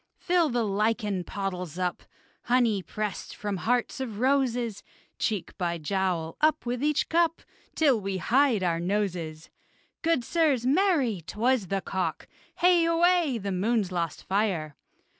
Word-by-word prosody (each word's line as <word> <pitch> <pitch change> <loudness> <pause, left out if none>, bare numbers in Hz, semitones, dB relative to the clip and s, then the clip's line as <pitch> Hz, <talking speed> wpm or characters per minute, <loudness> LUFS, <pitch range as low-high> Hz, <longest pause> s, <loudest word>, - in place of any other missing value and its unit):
Fill 350 -3 +2
the 240 -2 0
lichen 210 -2 0
pottles 180 -4 -4
up, 180 -1 -2 0.4
Honey 235 -5 +2
pressed 210 +2 -5
from 205 -2 -3
hearts 245 +6 0
of 235 -6 -4
roses: 245 -4 +1 0.4
Cheek 210 -6 -2
by 170 -1 -1
jowl, 170 -1 -2
up 310 -2 +2
with 245 +1 -2
each 300 0 +1
cup, 335 0 +1 0.3
Till 275 -8 +3
we 195 -1 -2
hide 240 - +2
our 170 -2 +1
noses. 175 -4 -2 0.5
Good, 325 -6 +1
sirs! 290 -4 +1
Marry! 280 - +2
'Twas 235 -1 +1
the 195 +2 -1
cock! 190 -1 -3 0.3
Hey, 350 -1 +4
away! 335 -4 +3
the 200 -2 -4
moon's 200 +1 0
lost 170 -3 -3
fire! 190 -7 -1
215 Hz, 140 wpm, -27 LUFS, 190-270 Hz, 0.5 s, Hey